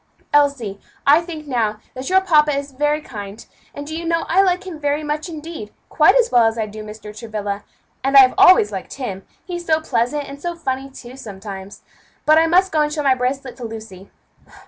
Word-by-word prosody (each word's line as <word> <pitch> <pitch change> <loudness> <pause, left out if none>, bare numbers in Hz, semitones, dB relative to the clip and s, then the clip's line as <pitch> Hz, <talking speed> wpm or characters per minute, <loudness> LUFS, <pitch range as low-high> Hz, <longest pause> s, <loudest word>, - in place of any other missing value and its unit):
"Elsie, 280 -9 +2 0.2
I 295 +4 +6
think 330 -3 -8
now 225 -6 -1
that 260 +4 -6
your 380 +1 +4
papa 300 -5 +3
is 280 0 -5
very 295 +3 0
kind; 205 -5 -9 0.3
and 285 - -8
do 315 +2 -6
you 335 - -4
know 335 0 0
I 370 +4 +5
like 370 -1 +1
him 345 -5 -7
very 290 +1 -1
much, 300 +3 -3
indeed; 315 -9 -8 0.2
quite - - +5
as 485 -1 +3
well 240 -2 +5
as 225 +1 -1
I 220 - 0
do 215 +1 -9
Mr. 210 0 -10
Travilla, 210 -2 -5 0.4
and 275 +1 +4
I 260 -1 +8
always 370 - +6
liked 190 -2 -6
him 200 -8 -6 0.2
he's 350 -2 -6
so 315 -1 +3
pleasant, 275 0 -1
and 280 +1 -10
so 345 +1 -3
funny, 270 -4 -3
too, 255 -2 -11
sometimes. 200 -4 -9 0.4
But 310 +1 +6
I 325 - +3
must 370 +3 +3
go 310 - +2
and 300 0 0
show 300 -1 -2
my 270 -2 +4
bracelet 255 0 -3
to 250 - -9
Lucy. 220 -4 -9
275 Hz, 210 wpm, -20 LUFS, 220-315 Hz, 0.4 s, I